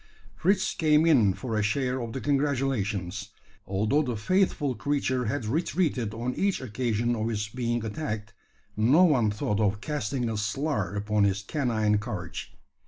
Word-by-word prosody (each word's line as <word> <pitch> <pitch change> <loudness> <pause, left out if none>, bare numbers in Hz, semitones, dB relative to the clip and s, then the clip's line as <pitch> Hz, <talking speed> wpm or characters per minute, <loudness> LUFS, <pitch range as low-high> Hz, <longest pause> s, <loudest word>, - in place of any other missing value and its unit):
Fritz 190 +3 +1
came 155 0 +3
in 115 - +4
for 120 -4 -4
a 110 - +2
share 125 +5 0
of 115 -1 -5
the 135 - -4
congratulations. 120 -9 -1 0.4
Although 105 +10 +2
the 125 -6 -2
faithful 160 - +1
creature 130 -2 -1
had 115 +2 -2
retreated 135 - 0
on 120 +2 -2
each 195 +5 0
occasion 120 -1 -1
of 110 0 -1
his 105 -2 -2
being 120 -1 -2
attacked, 110 -3 -4 0.4
no 125 +12 +5
one 130 -11 +4
thought 105 0 -1
of 105 -1 +1
casting 130 -2 -2
a 110 -1 -2
slur 110 - -1
upon 105 0 +1
his 100 0 +1
canine 110 -4 +1
courage. 100 -7 -6
120 Hz, 155 wpm, -27 LUFS, 105-140 Hz, 0.4 s, no